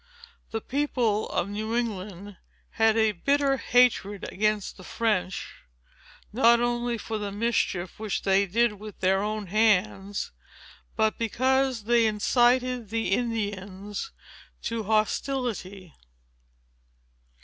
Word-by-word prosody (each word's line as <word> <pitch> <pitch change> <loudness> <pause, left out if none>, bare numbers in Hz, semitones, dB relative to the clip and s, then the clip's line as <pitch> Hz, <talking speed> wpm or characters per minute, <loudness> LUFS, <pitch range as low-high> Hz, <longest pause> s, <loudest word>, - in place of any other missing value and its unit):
The 225 - -3
people 245 -7 0
of 175 - -1
New 215 +3 -3
England 205 -4 -4 0.3
had 225 0 +3
a 220 -1 +4
bitter 275 +7 +1
hatred 235 -6 +2
against 210 0 0
the 185 - -13
French, 190 -4 -1 0.8
not 235 0 +5
only 240 0 0
for 220 0 -4
the 205 -1 -4
mischief 205 -4 -1
which 215 -2 -3
they 195 0 +3
did 220 +1 +1
with 210 -1 -10
their 190 +1 +2
own 210 0 -2
hands, 205 0 +1 0.6
but 220 -1 +1
because 260 +1 +1
they 235 +1 +3
incited 245 +2 +2
the 225 -2 -1
Indians 205 - -3 0.5
to 230 -2 -3
hostility. 215 - -1
220 Hz, 110 wpm, -26 LUFS, 200-240 Hz, 0.8 s, not